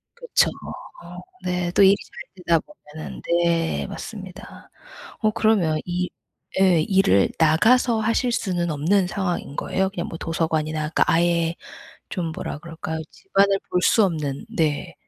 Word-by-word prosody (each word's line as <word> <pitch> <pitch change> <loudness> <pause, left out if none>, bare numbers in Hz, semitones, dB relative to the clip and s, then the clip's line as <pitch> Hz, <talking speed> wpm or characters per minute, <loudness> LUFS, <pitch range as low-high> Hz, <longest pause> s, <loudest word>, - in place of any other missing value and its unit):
그렇죠. 485 -1 +2 0.5
어 - - -10 0.3
네. 180 -1 -1
또 200 - +4
일이 195 +1 +7
잘 185 -2 -13
되다 170 -1 +4
보면은 155 - -11 0.2
네 165 -1 0
맞습니다. 195 0 -9 0.5
어 215 -1 +2
그러면 195 -9 +2
이 180 0 -2 0.5
예 180 -4 +5
일을 175 - +3
나가서 220 +9 +4
하실 230 +3 +1
수는 175 -6 -1
없는 180 +6 +2
상황인 180 -6 -3
거예요? 190 0 -1
그냥 175 -3 -4
뭐 165 - -6
도서관이나 155 -2 -1
그러니까 160 - +3
아예 170 0 +2 0.6
좀 175 -2 -3
뭐라 155 - -5
그럴까요? 160 0 -6
집안을 195 0 +1
볼 180 - 0
수 220 +2 +5
없는 150 -6 -2
네. 150 -3 0
175 Hz, 285 characters per minute, -23 LUFS, 160-195 Hz, 0.6 s, 일이